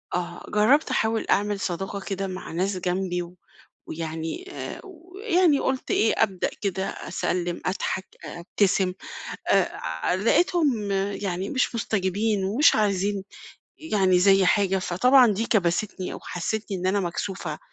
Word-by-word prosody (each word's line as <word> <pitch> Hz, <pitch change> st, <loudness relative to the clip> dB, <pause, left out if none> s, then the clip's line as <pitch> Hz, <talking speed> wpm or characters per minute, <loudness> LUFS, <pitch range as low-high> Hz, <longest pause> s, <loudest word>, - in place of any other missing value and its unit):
آه، 175 Hz, -1 st, -4 dB
جرّبت 235 Hz, +9 st, +3 dB
أحاول 220 Hz, 0 st, 0 dB
أعمل 205 Hz, 0 st, +1 dB
صداقة 195 Hz, +2 st, -3 dB
كده 195 Hz, 0 st, -4 dB
مع 185 Hz, -2 st, -7 dB
ناس 185 Hz, +3 st, -1 dB
جنبي 180 Hz, 0 st, -1 dB
و 175 Hz, +1 st, -9 dB, 0.5 s
ويعني 165 Hz, -, -5 dB
آآ، -, -, -6 dB
ويعني 365 Hz, -3 st, 0 dB
قُلت 265 Hz, -1 st, -2 dB
إيه، 220 Hz, -, +3 dB
أبدأ 190 Hz, -4 st, -1 dB
كده 195 Hz, -2 st, -1 dB
أسَلّم، 175 Hz, -1 st, -3 dB
أضحك، 190 Hz, 0 st, -2 dB, 0.2 s
أ -, -, -7 dB
ابتسم. 190 Hz, +1 st, +1 dB, 0.6 s
آآ، -, -, +2 dB
ع 80 Hz, -, -2 dB
لقيتهم 240 Hz, -, +2 dB, 0.2 s
يعني 190 Hz, -1 st, -3 dB
مش 255 Hz, -3 st, 0 dB
مستجبين 205 Hz, -1 st, 0 dB
ومش 230 Hz, +11 st, +4 dB
عايزين 200 Hz, -1 st, 0 dB, 0.5 s
يعني 195 Hz, -, +2 dB
زي 195 Hz, 0 st, +5 dB
حاجة، 195 Hz, -1 st, +3 dB
فطبعًا 245 Hz, +9 st, +5 dB
دي 225 Hz, +4 st, -1 dB
كبستني 185 Hz, -1 st, 0 dB
أو -, -, -7 dB
حسِّسِتني 200 Hz, +3 st, -3 dB
إن 185 Hz, +1 st, -2 dB
أنا 200 Hz, +2 st, +2 dB
مكسوفة 175 Hz, -3 st, -4 dB
195 Hz, 135 wpm, -25 LUFS, 180-220 Hz, 0.6 s, زي